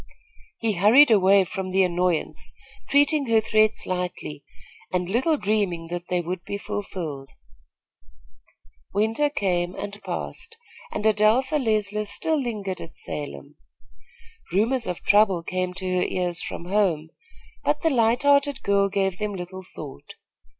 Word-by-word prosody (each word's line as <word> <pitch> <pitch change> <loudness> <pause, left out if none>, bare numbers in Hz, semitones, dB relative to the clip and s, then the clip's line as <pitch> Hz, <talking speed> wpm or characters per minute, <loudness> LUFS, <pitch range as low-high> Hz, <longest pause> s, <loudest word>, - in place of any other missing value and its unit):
He 225 -2 0
hurried 225 +10 +6
away 195 -1 +6
from 190 0 -5
the 190 +1 +3
annoyance, 175 -2 -1 0.4
treating 285 0 +4
her 225 -1 +4
threats 215 0 +2
lightly, 180 -5 -4 0.5
and 180 -1 -1
little 260 - +1
dreaming 195 -8 -1
that 175 0 -5
they 180 -1 0
would 175 +1 -5
be 200 - -4
fulfilled. 180 -10 -5 1.7
Winter 225 +8 +2
came 180 -8 -1
and 205 0 -6
passed, 460 - -6 0.3
and 210 - -4
Adelpha 220 +7 +3
Leisler 210 -2 0
still 285 +9 0
lingered 205 -7 -4
at 165 - -10
Salem. 145 0 -7 0.9
Rumors 230 +7 +1
of 180 - -4
trouble 200 -4 +4
came 185 +1 -2
to 185 -1 -2
her - - +2
ears 175 -2 -2
from 170 - -6
home; 180 -5 +1 0.5
but - - +1
the 325 - +2
light 235 0 +2
hearted 285 -1 +3
girl 200 0 +2
gave 195 -2 -1
them 210 -1 -2
little 185 +1 -7
thought. 150 - -10
200 Hz, 135 wpm, -24 LUFS, 180-220 Hz, 1.7 s, hurried